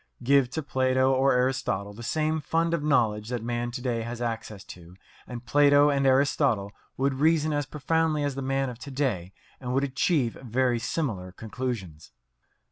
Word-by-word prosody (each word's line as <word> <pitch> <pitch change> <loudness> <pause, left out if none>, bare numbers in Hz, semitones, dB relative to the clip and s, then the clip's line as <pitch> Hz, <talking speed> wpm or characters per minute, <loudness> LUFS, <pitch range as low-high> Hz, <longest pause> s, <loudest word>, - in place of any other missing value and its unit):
Give 135 0 +4
to 160 +5 -4
Plato 130 -1 +2
or 135 +1 +3
Aristotle 125 -6 -1
the 110 - -10
same 155 +5 -1
fund 165 +3 0
of 170 - 0
knowledge 110 -7 +1
that 120 -3 -3
man 120 0 -2
to 125 +1 -7
day 120 -3 -1
has 115 +1 -6
access 115 -4 -4
to, 90 0 -13 0.3
and 120 -1 -8
Plato 145 +2 +5
and 140 -1 +1
Aristotle 130 -6 +2 0.3
would 135 +1 +1
reason 155 +2 +2
as 145 -2 -1
profoundly 155 +1 0
as 145 -1 -1
the 135 - -5
man 135 0 -1
of 120 - -12
to 140 - -9
day 125 -11 -2 0.3
and 125 -1 -3
would 135 - +2
achieve 140 -2 +1
very 125 0 0
similar 110 - -3
conclusions. 110 -7 -6
130 Hz, 175 wpm, -26 LUFS, 115-145 Hz, 0.3 s, Plato